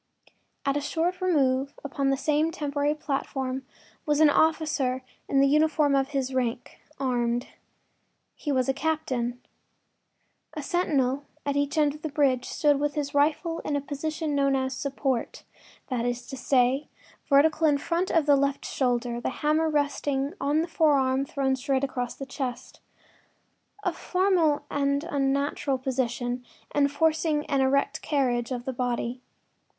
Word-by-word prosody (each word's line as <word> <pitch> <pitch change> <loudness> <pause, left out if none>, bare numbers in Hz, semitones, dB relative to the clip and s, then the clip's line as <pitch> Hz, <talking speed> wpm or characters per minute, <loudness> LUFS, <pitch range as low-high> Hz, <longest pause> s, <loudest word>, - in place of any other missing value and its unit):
At 275 - +1
a 290 - 0
short 335 +5 -1
remove 275 -6 +1
upon 275 -1 -1
the 270 - +2
same 305 +3 +1
temporary 290 -2 -1
platform 265 -3 -3 0.4
was 295 -1 +1
an 310 -2 +6
officer 295 -5 +1 0.3
in 275 - +4
the 275 - +5
uniform 300 0 +3
of 270 -1 +2
his 270 -2 -2
rank, 245 -2 -2 0.2
armed. 245 -2 0 0.8
He 295 - -4
was 255 -2 +1
a 270 - +2
captain. 265 -6 -1 1.2
A 300 - -4
sentinel 285 -5 0 0.2
at 285 -1 0
each 285 +2 0
end 295 -2 +3
of 300 - -12
the 315 - -3
bridge 270 -4 +2
stood 290 -2 +2
with 290 0 -1
his 290 -2 -2
rifle 315 +3 +1
in 295 - -2
the - - +2
position 300 +2 -3
known 275 -1 +2
as 260 0 -1
“support,” 270 -3 -2 0.5
that 250 -3 -1
is 245 0 -2
to 270 - -5
say, 260 +2 +2 0.4
vertical 310 +3 +4
in 290 -1 +4
front 340 +5 -1
of 330 -3 +2
the 290 -1 +6
left 280 0 0
shoulder, 245 -2 -1
the - - -1
hammer 305 +4 +1
resting 285 -1 0
on 290 +3 +2
the - - -4
forearm 275 -5 +2
thrown 270 -1 0
straight 265 0 -1
across 250 -3 -2
the 275 - -6
chest—a 270 +8 -8
formal 350 -6 +1
and 280 0 +1
unnatural 280 -2 0
position, 250 -1 -2 0.3
enforcing 300 +1 +2
an 275 -1 +1
erect 280 +3 +1
carriage 245 -5 0
of 245 -2 -4
the 265 - -2
body. 245 0 -2
280 Hz, 150 wpm, -27 LUFS, 260-300 Hz, 1.2 s, an